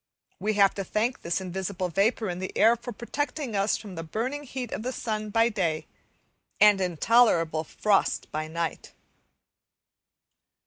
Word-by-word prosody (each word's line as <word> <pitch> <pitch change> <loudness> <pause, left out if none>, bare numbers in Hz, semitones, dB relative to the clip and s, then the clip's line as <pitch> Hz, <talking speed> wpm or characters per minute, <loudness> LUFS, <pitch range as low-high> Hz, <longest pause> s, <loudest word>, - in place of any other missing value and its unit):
We 215 +1 0
have 200 -1 +4
to 195 - -4
thank 225 +7 -1
this 170 +2 -1
invisible 185 0 -3
vapour 210 +5 +1
in 175 -1 -3
the 185 - -4
air 225 +3 +6
for 240 +1 -8
protecting 275 +2 -4
us 200 +1 +2
from 205 -4 -10
the 165 - -5
burning 245 - -3
heat 250 -3 -5
of - - -3
the 250 +3 -3
sun 215 -4 -3
by 225 +2 +3
day 170 -8 -1 0.7
and 210 -2 +6
intolerable 175 -3 +3
frost 200 +5 0
by 155 +1 -3
night. 165 +1 -4
205 Hz, 150 wpm, -27 LUFS, 180-230 Hz, 0.7 s, air